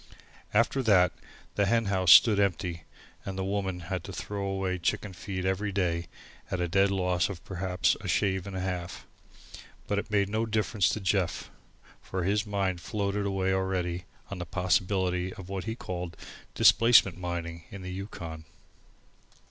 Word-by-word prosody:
After 115 +5 +2
that 95 -7 +5 0.4
the 100 -1 +1
hen 115 +1 +2
house 95 -3 +3
stood 105 -4 +8
empty 90 -4 -1 0.4
and 95 -1 -5
The 95 - -1
Woman 95 -2 -2
had 90 0 -4
to - - -7
throw 100 +4 -4
away 95 -1 -1
chicken 95 +3 -1
feed 95 +1 -5
every 95 +2 0
day, 85 -3 -1 0.4
at 90 - -2
a 90 - 0
dead 95 +3 +3
loss 90 -1 +1
of 90 -4 -8
perhaps 95 -1 0
a - - -6
shave 95 -2 +1
and 100 - -6
a - - -2
half. 90 -2 -4 0.8
But 100 -1 0
it - - -6
made 100 -2 +2
no 110 +3 -1
difference 110 -3 +1
to - - -1
Jeff, 95 -2 -1 0.5
for 95 -1 -4
his 105 +4 +1
mind 95 -3 -1
had - - -11
floated 100 -1 -1
away 95 -1 0
already 90 -2 -1 0.3
on 100 - -5
the 85 - -4
possibilities 90 0 0
of 95 -1 -10
what 95 -2 -4
he 110 0 -3
called 90 -6 -6 0.4
"displacement" 115 -6 +6
mining 85 -2 -4
on 100 -1 -8
the 90 - -5
Yukon. 85 -5 -7
95 Hz, 170 wpm, -29 LUFS, 90-100 Hz, 0.8 s, stood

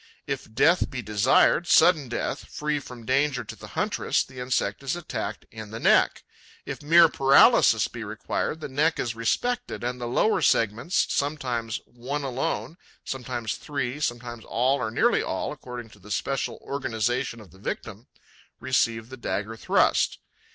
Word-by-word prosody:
If 135 -6 -5
death 165 +10 +3
be 125 -3 -5
desired, 105 - +3
sudden 160 -7 +5
death, 120 - -3
free 150 0 -2
from 125 -4 -11
danger 135 0 +1
to - - -9
the - - -11
huntress, - - +1
the 130 -1 -12
insect 125 -5 -1
is 135 +3 -2
attacked 110 -11 -5
in 110 -1 -8
the 110 +1 -6
neck; - - +3 0.4
if - - -6
mere 165 +3 +7
paralysis 135 -2 +5
be - - -7
required, 160 - -3
the - - -4
neck 150 +4 +1
is 120 - -2
respected 245 - -1
and 125 +1 -3
the 120 - -3
lower 215 - +2
segments 115 - +2
sometimes 125 -6 -2
one 130 +5 -5
alone, 130 +1 -3 0.3
sometimes 125 -4 -3
three, 140 -2 -3
sometimes 120 -4 -3
all 130 +4 +1
or 110 -3 -1
nearly 110 - +2
all, - - -3
according 120 -2 -8
to 105 - -17
the 105 +2 -15
special 135 +7 -2
organization 120 -2 -2
of 105 -4 -14
the 95 - -18
victim 100 - -6 0.5
receive 115 -3 0
the 130 - -9
dagger 110 -2 -3
thrust. - - +2
125 Hz, 160 wpm, -26 LUFS, 115-140 Hz, 0.5 s, mere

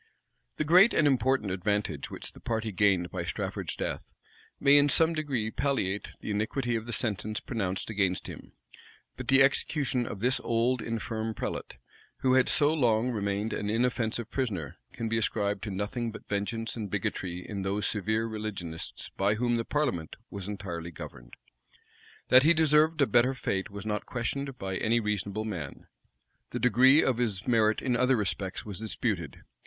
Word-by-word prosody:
The - - -1
great 180 +9 +6
and 155 - +4
important 130 -5 +2
advantage 105 +2 -1
which - - -6
the - - -15
party 110 -1 -2
gained 95 -3 +2
by - - -3
Strafford's - - -3
death, - - -4 0.5
may 140 0 +6
in 145 0 +4
some 160 +4 +4
degree 135 -9 -2
palliate 105 -9 -1
the - - -4
iniquity 115 +4 -1
of 115 0 -4
the - - -4
sentence 110 -1 -1
pronounced 100 -5 -3
against 95 -3 0
him: - - -10 0.6
but - - -7
the 135 0 +7
execution 135 -3 +1
of 100 - -6
this 125 +4 +2
old, 120 +2 +1
infirm 110 -1 -3
prelate, - - -5 0.4
who 130 -1 +3
had 130 -1 +4
so 150 +1 +5
long 120 -4 +2
remained 100 -1 -2
an 105 - -2
inoffensive 115 0 0
prisoner, 100 - -3
can 115 -1 -4
be 115 0 +1
ascribed 105 -2 -1
to - - -4
nothing 105 +4 -3
but - - -11
vengeance 115 +3 -2
and 110 -4 -5
bigotry 90 0 -3
in 100 -2 -4
those 100 +2 -1
severe 110 +2 0
religionists 105 -7 -5
by 100 +2 +2
whom 120 +2 +1
the 115 - -1
parliament 125 - -1 0.2
was 100 -2 -6
entirely 85 -5 -5
governed. 60 -6 -10 0.9
That 130 - +8
he 160 +4 +5
deserved 155 0 +4
a - - +6
better 125 +1 +3
fate 95 -6 -2
was 100 0 -8
not 105 -1 -3
questioned 135 +2 -3
by 95 -3 -3
any 115 +2 +2
reasonable 105 0 -2
man: 85 -10 -6 0.6
the - - -4
degree 130 +5 +6
of 125 -2 +1
his 105 -5 -1
merit 110 -3 +3
in 125 -2 +1
other 125 +1 +3
respects 95 -2 -2
was 105 -3 -4
disputed. 105 - -3
110 Hz, 170 wpm, -29 LUFS, 100-125 Hz, 0.9 s, That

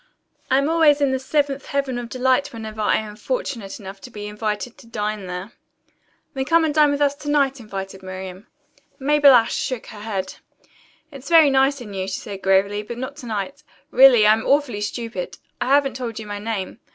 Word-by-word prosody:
"I 260 - +4
am 275 +1 +2
always 315 -3 +4
in 280 -2 +2
the 265 - 0
seventh 280 0 -1
heaven 275 -3 -1
of 240 -1 -7
delight 260 +2 +1
whenever 220 -2 -7
I 210 - +3
am 215 -1 -4
fortunate 235 - -4
enough 195 -1 -10
to - - -10
be 210 -3 -8
invited 210 +2 -4
to - - -16
dine 210 -3 -3
there." 180 +4 -6 0.8
"Then 265 -1 -2
come 330 +2 +4
and 305 - 0
dine 300 -1 +5
with 285 0 -1
us 280 -1 +2
to 290 - -6
night," 275 -2 +2
invited 195 -3 -7
Miriam. 185 +1 -8 0.5
Mabel 285 -1 +6
Ashe 230 -2 +3
shook 255 -3 -3
her 210 - -10
head. 200 -3 -4 0.7
"It's 275 0 -10
very 320 -4 +7
nice 270 0 +2
in 210 -4 -9
you," 190 -1 -3
she - - -3
said 200 -4 -8
gravely, 195 +2 +2
"but 235 +3 -8
not 260 +3 -5
to 250 - -9
night. 225 +7 -4 0.3
Really, 250 -4 +7
I 210 - +7
am 220 0 -1
awfully 275 -7 +1
stupid. 215 -3 -4 0.2
I - - 0
haven't 275 -1 +3
told 235 -3 -5
you 220 - -6
my 205 0 -5
name. 210 -1 -4
235 Hz, 205 wpm, -22 LUFS, 210-275 Hz, 0.8 s, very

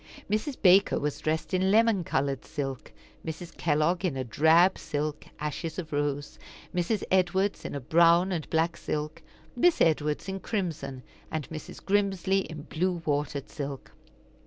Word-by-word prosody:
Mrs. 230 +6 -1
Baker 195 +1 +5
was 145 0 -2
dressed 155 +3 -2
in 185 +1 +2
lemon 220 -2 +4
colored 135 -3 -1
silk; 135 -3 -5 0.3
Mrs. 165 +1 -7
Kellogg 160 +4 +1
in 165 -8 0
a 130 - -1
drab 160 - +4
silk, 150 -1 -3
ashes 155 +2 -4
of 160 -5 -5
rose; 145 0 -2 0.3
Mrs. 180 +4 0
Edwards 190 +2 +1
in - - -4
a - - -2
brown 170 +6 +4
and 165 -4 -3
black 165 +1 +1
silk; 150 0 -4 0.3
Miss 345 +7 +4
Edwards 150 0 +1
in 195 0 -3
crimson, 160 - -3 0.3
and 155 -3 -3
Mrs. 155 -1 -8
Grimsly 195 -1 +2
in 155 -6 -6
blue 175 +2 -2
watered 145 -1 -1
silk. 140 -2 -6
165 Hz, 150 wpm, -28 LUFS, 150-190 Hz, 0.3 s, Baker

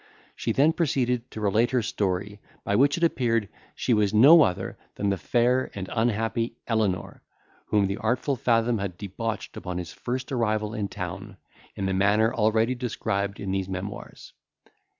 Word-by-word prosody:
She - - -2
then 150 +4 +4
proceeded 130 -7 0
to - - -8
relate 105 +4 +2
her 125 -3 +1
story, 100 0 -2 0.2
by 100 - 0
which 140 +6 +4
it 170 - -3
appeared, 115 -9 +1 0.3
she 125 - 0
was 105 -1 +2
no 145 +9 +8
other 90 -11 0 0.2
than 100 - -1
the 100 - 0
fair 125 +5 +1
and 95 -2 -5
unhappy 115 0 0
Elenor, 105 -6 -1 0.5
whom 105 -2 +2
the 100 +1 -2
artful 125 +5 0
Fathom 115 -1 +1
had 95 -3 -4
debauched 105 +3 -5
upon 90 -2 -5
his 90 -1 -6
first 130 +2 -4
arrival 110 -4 0
in 105 -3 -2
town, 95 +3 -7 0.4
in 100 - -3
the 95 - 0
manner 105 +4 +3
already 110 +2 +2
described 105 -5 -2
in 100 -2 -3
these 95 -1 -2
memoirs. 95 +2 -7
110 Hz, 165 wpm, -26 LUFS, 100-120 Hz, 0.5 s, no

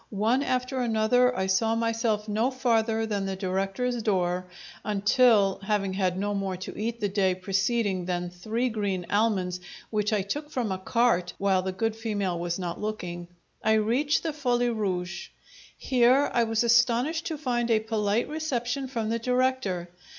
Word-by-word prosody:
One 230 +6 +2
after 255 -1 -1
another, 245 +2 +2
I 190 - 0
saw 220 +4 +2
myself 230 -2 0
no 220 +4 +1
farther 225 -4 +1
than 200 -3 -2
the 195 - -2
director's 195 +6 -1
door, 185 -3 0 0.4
until 210 0 +3
(having 195 -1 -1
had 185 -2 0
no 205 +1 -1
more 195 -2 -2
to 185 - -7
eat 230 +2 -3
the 205 - 0
day 190 -2 +1
preceding 195 0 0
than 175 -1 -2
three 220 +8 -2
green 200 -5 -2
almonds, 195 -4 +1 0.3
which 210 -1 0
I 210 -3 +1
took 295 +10 -4
from 240 -8 -2
a 190 - -2
cart 190 -4 +1
while 195 -2 +2
the 190 0 -3
good 220 +3 -1
female 205 -6 -2
was 170 0 -2
not 175 -2 -4
looking) 175 -5 -4 0.4
I 220 - +3
reached 240 +8 +2
the 320 -2 -2
Folie 245 -4 +1
Rouge. 180 -5 -3 0.5
Here 255 +2 +3
I 235 -2 +3
was 225 0 +1
astonished 240 +7 +2
to 320 - -3
find 240 -5 -1
a 225 -1 +4
polite 215 0 0
reception 275 -4 -2
from 230 -4 -3
the 230 +1 0
director. 250 -7 0
220 Hz, 165 wpm, -27 LUFS, 190-240 Hz, 0.5 s, a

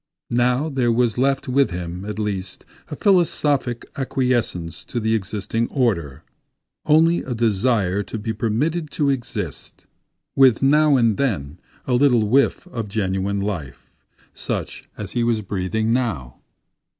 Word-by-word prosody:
Now 125 +4 +2
there 130 -5 +1
was 120 -1 +1
left 135 +1 +1
with 135 +2 +3
him, 90 +1 -5
at 105 0 -5
least, 100 -3 -4 0.2
a - - -6
philosophic 145 - +1
acquiescence 125 -10 -1
to 120 - -3
the 110 0 0
existing 110 +2 -2
order—only 130 - -1
a 125 - -4
desire 105 -3 +1
to 105 - -6
be 110 +1 -3
permitted 145 +10 -1
to 145 -2 +2
exist, 110 - -5 0.5
with 130 -2 +5
now 150 +1 +5
and 115 -4 +2
then 90 - -2 0.3
a 130 - -1
little 120 -4 +4
whiff 135 +9 +2
of 115 -10 -4
genuine 100 -1 -1
life, 90 -10 -5 0.4
such - - -5
as 105 -3 -6
he 120 - 0
was 115 -2 +1
breathing 105 +4 -1
now. 95 - -2
115 Hz, 135 wpm, -21 LUFS, 100-130 Hz, 0.5 s, with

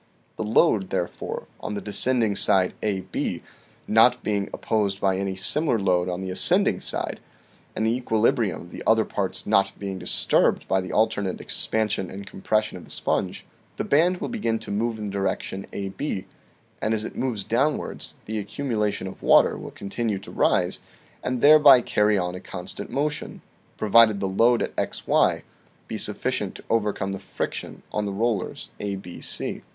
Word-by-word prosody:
The - - -3
load, 105 -2 +3
therefore, 85 - -3
on 105 - -4
the - - -2
descending 110 +1 +1
side 95 -1 +3
AB, 100 -3 -2 0.4
not 120 +3 +4
being 100 -2 -1
op - - -8
posed 100 -3 0
by 95 -1 +1
any 95 -1 -2
similar 135 +7 +2
load 90 -3 +1
on 90 +1 -3
the 95 -1 -4
ascending 90 - +3
side, - - -2 0.6
and 110 - 0
the 115 - +2
equilibrium 115 -5 +1
of 85 - -13
the - - -8
other 110 0 +4
parts 100 -2 -3
not 100 -2 +2
being 95 -2 -5
disturbed 90 - +2
by 95 - +2
the 90 - -6
alternate 105 -3 +1
expansion 105 -4 0
and 100 +1 -8
compression 105 +1 -1
of 90 - -11
the - - -18
sponge, - - -2 0.3
the - - -1
band 175 +5 +3
will - - -4
begin 160 - -1
to - - -8
move 110 +3 -1
in 105 - -5
the 100 - -4
direction 95 0 -3
AB; 100 +2 -4 0.6
and 110 +1 +1
as 110 0 -3
it - - -7
moves 120 -6 -2
downwards, 135 +9 -1
the 110 0 -3
accumulation 105 -2 -2
of 95 - -8
water - - +5
will - - -7
continue 105 +1 -3
to 95 - -10
rise, - - +1 0.4
and 125 -1 -2
thereby 145 -3 +8
carry 105 -3 +2
on 90 -1 -1
a 90 - -6
constant 95 +2 -7
motion, 150 +2 -3 0.3
provided 110 -1 +5
the 100 - -1
load 115 +5 +3
at - - -5
xy - - +1 0.4
be - - -5
sufficient - - -1
to - - -11
overcome 105 -3 0
the 95 - -4
friction - - -5
on 105 - 0
the - - -2
rollers 105 -1 -2
ABC. 100 -3 -2
105 Hz, 170 wpm, -25 LUFS, 95-115 Hz, 0.6 s, thereby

